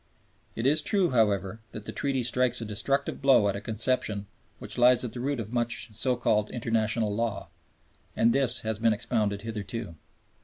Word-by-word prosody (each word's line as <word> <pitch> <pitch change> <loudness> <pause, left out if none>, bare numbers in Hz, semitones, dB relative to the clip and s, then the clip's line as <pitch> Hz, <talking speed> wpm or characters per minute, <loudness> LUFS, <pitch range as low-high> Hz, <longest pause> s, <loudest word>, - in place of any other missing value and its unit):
It 115 - -3
is 150 +3 +4
true, 190 +1 +1
however, 105 -3 +1
that 105 - -8
the - - -5
Treaty 135 -3 -1
strikes 125 +1 +2
a 115 - -3
destructive 110 +9 -2
blow 135 -7 +5
at 100 - -2
a 100 - -5
conception 110 -2 0 0.3
which - - -3
lies 125 +1 +5
at 120 - -5
the 125 - -6
root 140 +1 -2
of 110 +1 -6
much 120 -1 -1
of - - -16
so 125 +3 +1
called 110 -3 +1
international 115 -2 0
law, 115 0 -3 0.7
as 115 - +3
this 125 -2 +2
has 110 -1 -3
been 115 -1 +3
expounded 105 -2 -2
hitherto. 115 -3 -5
115 Hz, 185 wpm, -27 LUFS, 105-125 Hz, 0.7 s, blow